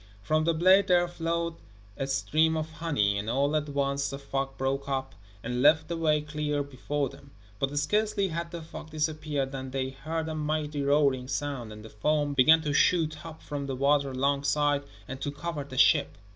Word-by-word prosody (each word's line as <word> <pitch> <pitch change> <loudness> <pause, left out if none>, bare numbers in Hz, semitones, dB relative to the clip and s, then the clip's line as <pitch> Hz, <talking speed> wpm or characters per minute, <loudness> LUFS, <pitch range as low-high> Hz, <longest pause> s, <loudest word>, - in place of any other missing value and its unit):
From 155 0 +1
the 170 -1 +2
blade 185 +4 +5
there 175 -1 +4
flowed 170 -1 -2 0.4
a 135 - -3
stream 155 +4 +2
of 155 0 -3
honey, 145 -11 0
and 105 +2 -4
all 140 +5 +1
at 150 -1 -1
once 140 0 0
the 140 - -5
fog 135 -1 -4
broke 135 +1 -2
up, 135 -1 -2 0.3
and 125 +1 -2
left 155 +3 +5
the 170 - -1
way 155 -2 +2
clear 150 -1 -2
before 140 +1 -3
them. 140 +2 -14 0.3
But 135 +2 -1
scarcely 200 +5 +1
had 170 0 -4
the 170 -1 -7
fog 155 0 -9
disappeared 150 -3 -2
than 130 -1 -5
they 130 0 -2
heard 160 +4 -4
a 160 - -3
mighty 150 -1 -2
roaring 140 -2 +2
sound, 135 -4 -3
and 105 0 -10
the - - -9
foam 145 +6 0
began 155 +4 +6
to 145 -2 -1
shoot 155 -1 +2
up 160 -1 -10
from 145 -1 -4
the 135 - -3
water 140 +1 +2
alongside, 140 +2 +1 0.2
and 135 0 -7
to 145 - -2
cover 145 +1 -4
the 130 -2 -9
ship. 140 +1 +4
145 Hz, 195 wpm, -28 LUFS, 135-155 Hz, 0.4 s, began